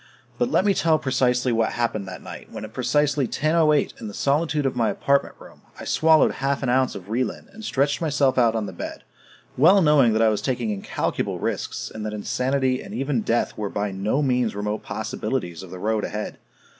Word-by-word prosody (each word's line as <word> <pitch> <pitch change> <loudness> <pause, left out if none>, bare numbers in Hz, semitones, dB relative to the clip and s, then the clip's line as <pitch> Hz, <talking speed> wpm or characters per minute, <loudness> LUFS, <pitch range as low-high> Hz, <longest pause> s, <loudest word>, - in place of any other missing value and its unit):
But 245 0 +2
let 190 - +2
me 200 - +4
tell 165 -3 +3
precisely 125 -3 +1
what 115 -1 +1
happened 110 -4 -1
that 90 - -8
night - - -10
when - - -6
at 110 - -12
precisely 140 +2 +1
10:08 155 +2 +1
in 110 - -5
the 105 - -8
solitude 150 +1 +1
of 135 - 0
my 115 -3 +2
apartment 140 +7 +1
room, - - -15 0.2
I - - -7
swallowed 160 -1 +4
half 140 +1 -2
an 130 - 0
ounce 130 +1 +2
of 95 - -7
Relin 115 +2 -2
and 220 - -11
stretched 140 -4 0
myself 145 -4 +2
out 115 -3 +3
on 110 -2 -1
the - - -7
bed, - - -7 0.5
well 170 +9 +6
knowing 150 - +5
that 110 - +2
I 110 - +5
was 105 - -1
taking 120 -4 -1
incalculable 100 -2 -2
risks, - - -3
and 110 - -6
that 105 - -4
insanity 130 +4 0
and - - -8
even 135 -2 0
death 115 +2 0
were 105 -2 -3
by 100 0 -2
no 105 +9 0
means 125 -5 +1
remote 105 +1 -2
possibilities 110 -5 -4
of 95 - -10
the 95 - -8
road 110 +2 -1
ahead. 105 +1 -4
125 Hz, 205 wpm, -23 LUFS, 110-140 Hz, 0.5 s, well